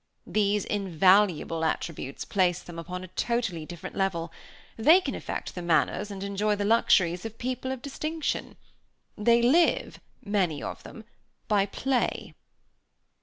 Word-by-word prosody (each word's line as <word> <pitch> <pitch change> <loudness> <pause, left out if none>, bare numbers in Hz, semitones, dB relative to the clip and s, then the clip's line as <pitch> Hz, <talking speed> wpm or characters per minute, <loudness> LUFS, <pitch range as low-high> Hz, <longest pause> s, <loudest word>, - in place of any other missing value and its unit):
These 205 -1 +1
invaluable 185 -3 +2
attributes 160 -3 -3
place 180 -3 +1
them 170 -1 -9
upon 180 +2 -6
a - - -8
totally 200 -9 -2
different 175 -2 -8
level. 175 -4 -1 0.4
They 310 +11 +6
can 375 - -4
affect - - -5
the 180 - -6
manners 170 +4 +1
and 195 -1 -6
enjoy 200 +1 0
the 205 0 -2
luxuries 185 -5 +3
of 225 0 -7
people 255 +1 -3
of 260 -2 -6
distinction. 310 +3 -3 0.6
They 235 +2 +3
live, 320 +8 +3 0.3
many 185 -8 0
of - - -6
them, 225 - -11 0.4
by 205 -2 +2
play." 260 +3 -1
200 Hz, 135 wpm, -27 LUFS, 175-235 Hz, 0.6 s, They